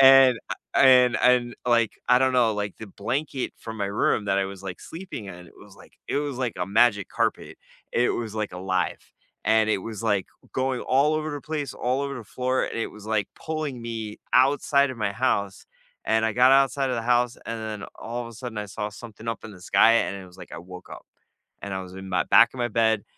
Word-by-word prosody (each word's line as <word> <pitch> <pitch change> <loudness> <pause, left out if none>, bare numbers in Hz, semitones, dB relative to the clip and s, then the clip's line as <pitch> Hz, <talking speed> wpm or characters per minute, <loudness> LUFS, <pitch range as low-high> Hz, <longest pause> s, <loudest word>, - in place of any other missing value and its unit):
And 135 -2 +8 0.4
I - - +5
and 125 -2 +6
and 125 -1 +3
like 115 -3 +3 0.2
I 125 - +6
don't 130 0 +3
know 115 -3 +3
like 100 -2 -3
the 110 - -8
blanket 130 +7 -3
from 110 -1 -8
my 100 - -1
room 105 - +2
that 100 -1 +2
I 95 - +1
was 100 0 -9
like 90 -3 -7
sleeping 170 - -8
in, 90 -2 -10
it - - -23
was - - -15
like - - -17
it - - -1
was 140 -4 -4
like 125 -3 -2
a 90 - -2
magic 105 -1 +3
carpet. - - -2 0.3
It 120 +1 +2
was 115 -3 -4
like 105 -3 -3
alive. 95 0 -2 0.4
And 110 +1 +3
it 110 - +2
was 110 0 -6
like 100 -4 +1 0.3
going 130 -1 -1
all 140 +4 +3
over 155 0 -2
the 145 -1 -5
place, 150 -2 -4
all 130 +2 -1
over 140 0 -3
the 120 - -8
floor, 130 +1 +1
and - - -5
it 115 - -1
was 105 - -13
like 110 -2 0
pulling 155 -6 -4
me 110 -2 -5
outside 140 +2 +4
of 130 - -7
my 100 -2 -1
house, 100 -4 -1 0.4
and 110 0 +2
I 110 - +1
got 125 +2 +6
outside 135 0 +3
of 125 - -1
the 115 - -2
house, 120 +1 +1
and 115 0 -4
then 110 -1 -5
all 120 +2 -5
of 115 - -8
a - - -11
sudden 120 -1 -7
I 105 - -3
saw 105 +1 -4
something 110 0 -10
up 115 - -4
in 110 - -8
the 90 - -14
sky, 115 - +5
and 100 - -4
it - - -12
was 90 +1 -17
like - - -12
I - - -6
woke 90 - -10
up. - - -10 0.6
And 100 -1 -4
I 95 - -3
was 90 -1 -11
in 95 - -9
my 90 -1 +1
back - - +6
of 130 - -9
my 120 - 0
bed 110 -1 +2
115 Hz, 240 wpm, -25 LUFS, 105-130 Hz, 0.6 s, And